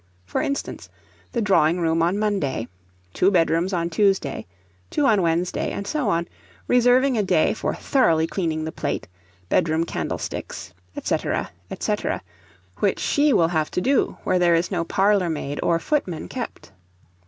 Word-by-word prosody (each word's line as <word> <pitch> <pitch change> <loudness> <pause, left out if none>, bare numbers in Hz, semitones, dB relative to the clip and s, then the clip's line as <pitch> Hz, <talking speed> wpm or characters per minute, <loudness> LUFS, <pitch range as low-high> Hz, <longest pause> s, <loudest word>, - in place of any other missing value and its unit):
For 95 - -2
instance, 280 - -4 0.4
the 235 -3 -1
drawing 180 -4 +3
room 165 -1 +1
on 175 +4 +2
Monday, 190 - -1 0.5
two 185 - +3
bedrooms 170 0 +2
on 170 -2 -1
Tuesday, 190 - +1 0.4
two 295 - +1
on 215 -7 +4
Wednesday, 170 +1 0
and 200 - -5
so 265 0 -1
on, 170 -2 0 0.4
reserving 250 0 +4
a - - +4
day 195 - +2
for - - -2
thoroughly 165 - +2
cleaning 165 -3 -2
the 160 - -4
plate, 145 - -3 0.4
bedroom 160 - +2
candlesticks, 90 - -5 0.3
&c. - - +1 0.6
&c., 210 - +1 0.8
which - - +1
she 290 0 +2
will 165 -9 +4
have 160 -3 0
to - - -1
do 265 +8 +1
where 185 - +1
there 175 -1 +4
is 170 +4 0
no 175 -3 0
parlour 195 +1 +2
maid 145 -2 -3
or 170 - +2
footman 180 - -2
kept. 245 - -7
180 Hz, 155 wpm, -23 LUFS, 165-210 Hz, 0.8 s, on